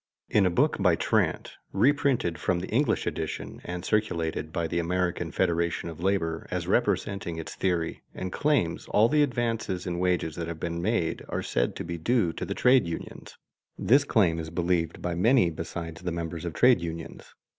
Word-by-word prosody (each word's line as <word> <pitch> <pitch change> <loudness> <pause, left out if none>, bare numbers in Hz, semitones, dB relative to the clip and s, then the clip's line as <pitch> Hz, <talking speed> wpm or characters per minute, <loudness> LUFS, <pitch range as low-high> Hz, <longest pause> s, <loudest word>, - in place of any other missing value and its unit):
In 100 -3 +4
a - - +3
book 85 - +2
by - - +4
Trant, - - 0
reprinted 125 - +2
from 85 - +1
the 90 - -6
English 140 +7 +1
edition - - -4
and 90 0 -5
circulated 85 -7 -1
by 85 0 -1
the 85 - -1
American 85 -1 -1
Federation 85 0 0
of 80 0 -9
Labor 85 -4 0
as - - -2
representing 90 -4 0
its 80 - -6
theory 85 -3 -1
and 90 0 -5
claims, 130 - +1
all 110 +2 +4
the 150 +4 +3
advances 115 -8 -1
in 85 -1 -2
wages 90 -3 0
that 85 -1 -3
have 85 -1 -5
been 85 0 -3
made 95 -3 0
are - - -2
said - - 0
to - - -4
be 85 -1 -5
due 100 -2 +1
to - - -4
the - - -4
trade 125 -6 +4
unions. 85 - -7 0.4
This 135 +4 +4
claim 90 -11 +2
is 80 -1 -5
believed 85 -1 -1
by 90 - -1
many 100 +1 +4
besides 80 +1 -6
the 90 -1 -3
members 85 -1 -4
of 85 - -4
trade 125 -6 +5
unions. 85 -1 -7
85 Hz, 185 wpm, -27 LUFS, 85-105 Hz, 0.4 s, trade